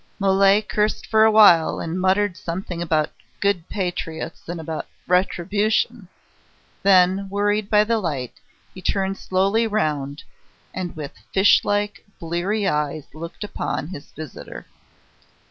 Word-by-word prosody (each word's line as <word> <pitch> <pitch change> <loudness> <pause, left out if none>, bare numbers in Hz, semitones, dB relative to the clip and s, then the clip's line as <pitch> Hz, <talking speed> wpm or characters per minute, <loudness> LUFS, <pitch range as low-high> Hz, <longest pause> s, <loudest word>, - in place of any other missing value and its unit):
Mole 195 +1 +4
cursed 210 0 -1
for 220 0 +4
awhile, 210 -7 +6
and 170 +3 -3
muttered 190 0 +2
something 175 0 -5
about 155 -3 0 0.3
"good 200 -4 0
patriots" 175 -5 -4
and 175 -1 -4
about 160 -1 -5 0.2
"retribution." 200 +4 0 0.7
Then, 190 0 +4
worried 205 +1 0
by 210 -1 +5
the 225 +1 +1
light, 145 - -3 0.4
he 185 - -10
turned 195 +1 -1
slowly 195 +5 +1
round, 150 -9 -2 0.5
and 185 -2 -5
with 150 -3 -6 0.2
fish 195 +1 +5
like, 205 0 -1 0.2
bleary 180 +5 -1
eyes 150 -3 -2
looked 170 +5 -8
upon 165 -6 -4
his 145 -6 -9
visitor. 155 -3 -9
190 Hz, 125 wpm, -22 LUFS, 165-205 Hz, 0.7 s, awhile